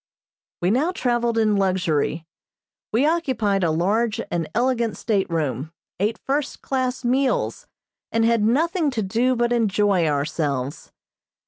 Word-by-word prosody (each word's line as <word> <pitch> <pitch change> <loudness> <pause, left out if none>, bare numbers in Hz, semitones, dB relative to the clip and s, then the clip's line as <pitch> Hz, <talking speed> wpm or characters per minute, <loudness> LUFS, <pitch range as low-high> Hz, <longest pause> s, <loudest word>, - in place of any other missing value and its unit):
We 180 - +3
now 290 +10 +2
traveled 240 -7 0
in 215 -2 +3
luxury. 175 -4 0 0.7
We 235 +6 +2
occupied 260 - +1
a 170 - +2
large 210 +8 +1
and 165 -2 -2
elegant 235 -2 +1
stateroom, 160 - -1 0.3
ate 215 +3 0
first 280 +1 -3
class 260 -1 -2
meals, 260 +2 0 0.4
and 225 0 +2
had 230 -1 +3
nothing 310 - +2
to 220 - +1
do 235 +6 +1
but 240 0 +1
enjoy 205 -6 +2
ourselves. 145 -2 -2
220 Hz, 125 wpm, -23 LUFS, 180-250 Hz, 0.7 s, We